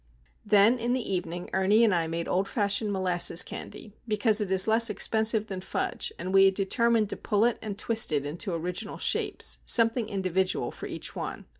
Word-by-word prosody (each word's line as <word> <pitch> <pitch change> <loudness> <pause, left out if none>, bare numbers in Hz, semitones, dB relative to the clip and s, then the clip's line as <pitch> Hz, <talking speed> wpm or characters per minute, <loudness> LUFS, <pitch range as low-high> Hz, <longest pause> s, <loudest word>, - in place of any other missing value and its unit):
Then 215 +3 +4
in 240 +1 -1
the 250 -6 -2
evening 175 -1 -4
Ernie 195 +4 +3
and 220 -4 +3
I 165 -2 0
made 165 +1 -4
old 190 +2 0
fashioned 205 -2 0
molasses 180 -3 +1
candy, 210 - -9
because 215 0 0
it 205 - -2
is 190 +1 +3
less 225 +1 +4
expensive 220 +1 +1
than 190 -4 -6
fudge 190 - -3
and 185 +2 -5
we 195 0 +6
had 195 0 +3
determined 220 +2 +1
to - - -3
pull 210 +2 +1
it 240 - 0
and 210 -2 -5
twist 225 0 +1
it 145 -2 0
into 165 +6 -3
original 180 +5 -4
shapes, - - 0
something 230 -1 +2
individual 190 -2 -1
for - - -8
each - - -6
one. - - -6
200 Hz, 190 wpm, -27 LUFS, 185-220 Hz, -, we